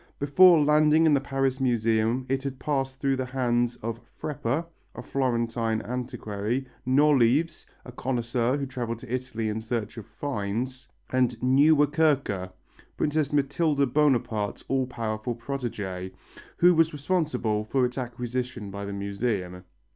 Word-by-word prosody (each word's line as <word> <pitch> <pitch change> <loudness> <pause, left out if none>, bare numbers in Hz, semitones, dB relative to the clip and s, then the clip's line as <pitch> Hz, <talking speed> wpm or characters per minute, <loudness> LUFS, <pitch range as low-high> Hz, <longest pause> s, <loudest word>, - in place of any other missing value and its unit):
Before 165 +5 +6
landing 150 +2 +4
in 155 - +5
the 140 - +3
Paris 135 -1 -1
Museum 115 0 +1
it 135 +1 0
had 135 -1 -5
passed 135 -1 -2
through 135 -2 +1
the 130 - -2
hands 120 -2 0
of 115 0 -3 0.2
Freppa 145 +2 -2 0.3
a - - -7
Florentine 115 -4 0
antiquary 120 0 -3 0.2
Nolives, 140 +2 +3 0.2
a 125 - -9
connoisseur 120 0 -1
who 140 - -2
travelled 120 -3 -5
in 120 - -9
Italy 125 -3 -2
in 110 +1 -2
search 110 -1 -4
of 110 - -8
"finds," 125 +2 -4 0.2
and 125 -2 +1
Nieuwerkerque, 145 - +3 0.5
Princess 150 -1 0
Mathilde 140 -1 +1
Bonaparte's 120 -8 +1
all 130 -1 0
powerful 115 -1 -3
protégé, 105 -8 -5 0.5
who 180 +1 +6
was 160 -1 +3
responsible 145 -9 0
for 125 +4 +1
its 125 +2 -3
acquisition 125 -3 -4
by 100 +1 -5
the 100 - -5
Museum. 100 -2 -3
125 Hz, 135 wpm, -26 LUFS, 115-140 Hz, 0.5 s, Before